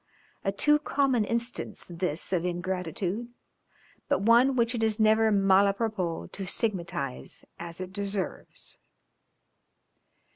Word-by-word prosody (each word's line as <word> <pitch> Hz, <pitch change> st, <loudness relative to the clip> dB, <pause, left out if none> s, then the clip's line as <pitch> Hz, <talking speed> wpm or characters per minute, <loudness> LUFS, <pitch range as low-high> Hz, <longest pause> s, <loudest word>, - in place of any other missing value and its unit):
A 195 Hz, -, +1 dB
too 295 Hz, +9 st, +3 dB
common 275 Hz, -6 st, +1 dB
instance 235 Hz, +2 st, -2 dB
this 175 Hz, 0 st, -2 dB
of 175 Hz, -2 st, +1 dB
ingratitude, 180 Hz, +4 st, -3 dB, 0.8 s
but -, -, +2 dB
one 240 Hz, +5 st, +5 dB
which 235 Hz, -1 st, +2 dB
it 235 Hz, -, -2 dB
is 220 Hz, 0 st, +1 dB
never 220 Hz, 0 st, +4 dB
mal 195 Hz, 0 st, +4 dB
à 195 Hz, -, -12 dB
propos 200 Hz, -7 st, -2 dB
to 195 Hz, -1 st, -6 dB
stigmatize 170 Hz, -, -3 dB
as 170 Hz, 0 st, -7 dB
it 185 Hz, 0 st, -6 dB
deserves. 200 Hz, -1 st, -2 dB
200 Hz, 120 wpm, -28 LUFS, 180-230 Hz, 0.8 s, one